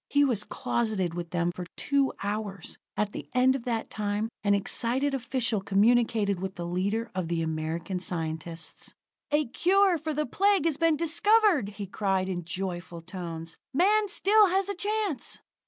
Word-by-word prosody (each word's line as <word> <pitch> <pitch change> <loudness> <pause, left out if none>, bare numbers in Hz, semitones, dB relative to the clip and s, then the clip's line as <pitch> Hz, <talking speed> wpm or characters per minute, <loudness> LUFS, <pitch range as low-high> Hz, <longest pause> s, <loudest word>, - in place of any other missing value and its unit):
He 285 0 +4
was 230 -6 +1
closeted 210 -7 -1
with 170 -1 -5
them 175 0 0
for 180 0 -7
two 280 -1 +1
hours. 205 -3 -4 0.2
At 210 -1 0
the - - -8
end 255 +1 +4
of 255 - -5
that 230 -2 -2
time 210 +1 -2
an 200 -1 +4
excited 245 +7 +1
official 240 -4 0
communicated 210 -1 +2
with 190 +1 -4
the 175 - -5
leader 200 +6 -1
of 185 -2 -2
the 165 -1 -1
American 160 +3 -3
scientists. 165 -1 -5 0.3
"A 300 0 +2
cure 375 +4 +3
for 310 -1 -3
the 300 +1 0
Plague 390 +5 +2
has 320 -4 +1
been 330 0 +3
discovered!" 340 - +3
he 200 0 -5
cried 190 -1 -1
in 175 -2 -3
joyful 175 -1 -4
tones. 165 -2 -7 0.2
"Man 415 +6 +4
still 415 +2 +4
has 385 +2 +1
a - - 0
chance!" 415 -4 -2
215 Hz, 165 wpm, -28 LUFS, 180-295 Hz, 0.3 s, He